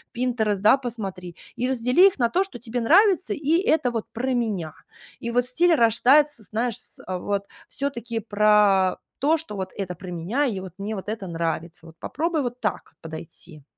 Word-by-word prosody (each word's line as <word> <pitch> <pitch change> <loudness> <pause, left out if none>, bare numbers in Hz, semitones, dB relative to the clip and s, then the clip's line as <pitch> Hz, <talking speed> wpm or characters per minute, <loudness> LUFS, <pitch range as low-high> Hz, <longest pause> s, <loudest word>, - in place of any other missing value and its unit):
Pinterest, 230 -5 0
да, 210 +7 +5
посмотри, 195 -9 -6 0.2
и 250 - -1
раздели 255 +7 +4
их 380 - -2
на 235 -2 +3
то, 370 +9 +2
что 385 -10 -10
тебе 240 +1 -4
нравится, 375 - +4
и 300 +2 +1
"это 315 - +2
вот 230 -3 -3
про 255 +3 -1
меня". 210 -10 -2 0.5
И 235 - -4
вот 245 +1 +2
стиль 340 +7 +3
рождается, 265 +2 +4
знаешь, 225 +3 -2
с, 250 - -11
э, 185 0 -4
вот 200 +2 -3 0.2
всё-таки 240 -5 -3
про 205 -3 +3 0.2
то, 305 +5 +2
что 305 -10 -7
вот 190 -1 -4
это 185 -3 -4
про 180 +1 -9
меня, 185 - -1
и 220 -8 -2
вот 185 -2 -9
мне 200 +2 -4
вот 195 +1 -6
это 215 -2 -4
нравится. 165 0 -4
Вот 160 - -14
попробуй 320 -1 -1
вот 245 0 -4
так 210 - -3
подойти. 160 -1 -9
230 Hz, 185 wpm, -24 LUFS, 190-260 Hz, 0.5 s, да